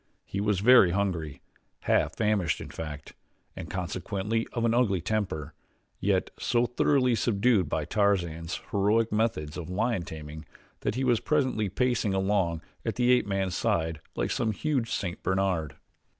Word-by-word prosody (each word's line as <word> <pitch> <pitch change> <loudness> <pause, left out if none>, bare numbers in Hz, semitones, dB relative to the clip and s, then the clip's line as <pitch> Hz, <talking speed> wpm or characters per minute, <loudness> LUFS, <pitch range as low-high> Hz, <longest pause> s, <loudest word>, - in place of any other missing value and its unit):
He 100 - -3
was 105 -2 +1
very 120 -4 +7
hungry 85 -7 -2 0.4
half - - +1
famished 105 -6 +1
in - - -8
fact 75 -3 -7 0.4
and 80 - -7
consequently 100 +5 -2
of 115 -1 -1
an 115 - +2
ugly 115 -6 +2
temper, 80 -6 -2 0.5
yet - - +1
so 120 0 +2
thoroughly 125 +1 +2
subdued 105 -4 +2
by 75 -1 -1
Tarzan's 85 -5 0
heroic 105 +3 +2
methods 105 -9 -1
of 90 -1 -6
lion 110 +2 0
taming 80 -1 -8 0.3
that - - -2
he 130 - -1
was 120 -3 +3
presently 130 -9 0
pacing 120 -2 0
along 95 -4 0 0.2
at - - -2
the 125 0 +3
ape 125 -4 +3
man's 95 -2 -1
side 80 -2 0
like - - -1
some 110 -2 0
huge 130 -2 -1
St. 90 -2 -3
Bernard. 95 -5 0
100 Hz, 150 wpm, -28 LUFS, 85-115 Hz, 0.5 s, very